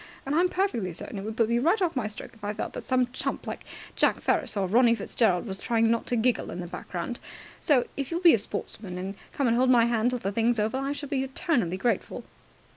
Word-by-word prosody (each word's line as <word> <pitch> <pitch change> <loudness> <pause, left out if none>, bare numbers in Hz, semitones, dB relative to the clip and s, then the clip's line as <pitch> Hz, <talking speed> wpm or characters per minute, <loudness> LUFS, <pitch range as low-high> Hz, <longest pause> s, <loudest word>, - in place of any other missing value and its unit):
And 275 - -2
I'm 350 +4 +3
perfectly 240 - -1
certain 195 +4 -7
it 195 - -6
would 220 0 -5
put 230 - +3
me 235 0 +2
right 340 - +3
off 355 -5 0
my 245 -5 0
stroke 210 - -8
if 220 - -21
I 205 +1 -2
felt - - -4
that - - -6
some 255 -1 +1
chump - - -3
like - - -5 0.3
Jack - - +3
Ferris - - 0
or 195 -1 +1
Ronnie 235 +4 +5
Fitzgerald 200 -3 +1
was 195 -3 -4
trying 230 0 +2
not 230 - 0
to 245 - +1
giggle 240 +1 +1
in 175 - -6
the 180 - -4
background. 180 +5 -5 0.4
So, 270 -5 +3
if 275 -2 -3
you 335 - -1
will 355 - -6
be 340 - +9
a 230 - +3
sportsman 200 -2 -5
and 190 +2 -4 0.2
come 280 - -1
and 230 - +3
hold 255 +2 +3
my 240 -2 +6
hand 235 0 +2
till 250 - -1
the 200 -4 -3
thing's 230 +3 +2
over, 220 +4 0
I 275 +1 -2
shall 285 -1 -6
be 275 -2 0
eternally 260 - 0
grateful." 235 +5 -1
235 Hz, 255 wpm, -27 LUFS, 205-260 Hz, 0.4 s, be